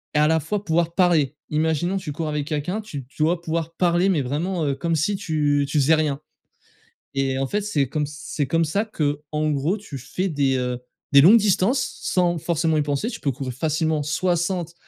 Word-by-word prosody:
et - - +3
à 150 - +5
la 160 +1 +3
fois 200 +7 -3
pouvoir 170 -1 0
parler. 160 -6 +3
Imaginons, 160 +4 0
tu 180 -6 -5
cours 155 +2 -3
avec 150 -1 -2
quelqu'un, 165 +7 -2
tu 145 -11 -7
tu 150 +4 -3
dois 170 +2 +1
pouvoir 165 0 -3
parler 175 +2 +2
mais 160 -7 +2
vraiment, 160 +6 -2
heu, 140 - 0
comme 165 +4 -1
si 200 +7 +1
tu 150 -6 +1
tu 150 0 +1
faisais 155 +4 +5
rien 150 -2 -1 0.9
et 135 -1 0
en 135 - 0
fait, 210 0 -1
c'est 150 -10 0
comme 150 +2 -1
ç - - -10
c'est 145 -3 -2
comme 165 +5 +2
ça 200 +8 0
qu'en 150 -4 -2
gros, 150 +7 0
tu 175 -10 -8
fais 185 +9 -3
des, 140 -4 +1
heu, 125 -1 -2 0.3
des 140 -1 +8
longues 200 +10 +8
distances 210 +4 +1
sans 175 -2 +1
forcément 160 0 0
y 150 - +2
penser. 145 - -1
Tu - - -6
peux 140 - -1
courir 130 0 -5
facilement 155 +2 0
60 175 +2 -1
155 Hz, 210 wpm, -23 LUFS, 145-175 Hz, 0.9 s, des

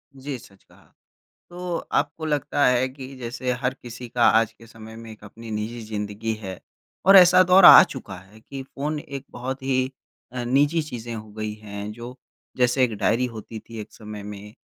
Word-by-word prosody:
जी, 135 0 -6
सच 100 -3 -19
कहा। - - -24 0.6
तो 175 -1 -4
आपको 145 +2 -2
लगता 145 -1 0
है 125 +1 +3
कि 135 0 -10
जैसे 125 +1 -3
हर 125 0 0
किसी 120 -1 -10
का 120 0 0
आज 110 0 +3
के 115 0 -17
समय 110 -1 -12
में 115 0 -10
एक 105 -1 -14
अपनी 115 +2 -10
निजी 110 +3 -4
ज़िंदगी 105 +1 -4
है 95 -3 -7 0.5
और 195 - +8
ऐसा 185 0 +8
दौर 185 +1 +6
आ - - +12
चुका 120 -7 -8
है 95 +4 -18
कि 135 +4 -8
फ़ोन 145 +3 -4
एक 140 -2 -8
बहुत 130 +2 -5
ही 130 -1 0 0.4
अ, 125 -1 -4
निजी 145 +6 +2
चीज़ें 120 -5 -7
हो 110 -1 -9
गई 110 0 -4
हैं, 105 -1 -7
जो 120 +3 -9 0.4
जैसे 125 +1 +3
एक 120 -3 +1
डायरी 120 +5 +1
होती 115 -2 -8
थी 115 0 -10
एक - - -11
समय 105 -2 -9
में, 105 0 -9
120 Hz, 190 wpm, -24 LUFS, 110-135 Hz, 0.6 s, आ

